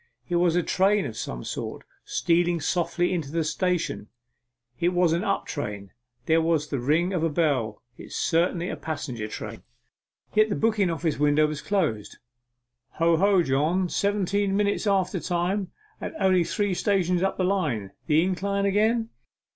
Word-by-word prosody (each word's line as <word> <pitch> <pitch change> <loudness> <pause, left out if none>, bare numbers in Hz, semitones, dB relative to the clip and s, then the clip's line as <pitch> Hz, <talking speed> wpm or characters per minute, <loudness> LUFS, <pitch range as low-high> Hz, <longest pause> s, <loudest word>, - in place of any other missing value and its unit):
It 175 - 0
was 175 -1 +3
a 175 - +2
train 195 +3 +2
of 110 - -5
some 60 - -5
sort, - - -5 0.2
stealing 175 0 +1
softly 175 +3 0
into 155 -6 -3
the 165 0 0
station, 170 -1 -1
and 105 - -15 0.7
it 175 +1 +1
was 175 -2 +3
an 170 +3 0
up 195 -2 0
train. 105 -8 -5 0.3
There 165 +1 +3
was 160 -2 +1
the 140 - -2
ring 160 +9 +1
of 175 - 0
a 165 - +2
bell. 140 -9 0 0.2
It - - -8
was - - -9
certainly 170 +1 +1
a - - -3
passenger 130 -8 -5
train. - - -7 0.7
Yet 215 0 +4
the 200 - 0
booking 215 -4 +2
office 165 -2 -1
window 150 +1 +4
was 150 -1 -3
closed. 155 - -1 0.8
'Ho, 165 0 +3
ho, 195 0 +4
John, 160 +7 +1
seventeen 200 0 0
minutes 205 +1 0
after 190 -1 +1
time 180 +3 -1 0.3
and - - -5
only 185 -2 +4
three 205 0 0
stations 180 -2 +1
up 195 - 0
the 185 - 0
line. 150 - 0 0.2
The 155 0 +4
incline 200 +2 -1
again? 220 +3 +1
175 Hz, 170 wpm, -26 LUFS, 155-195 Hz, 0.8 s, Yet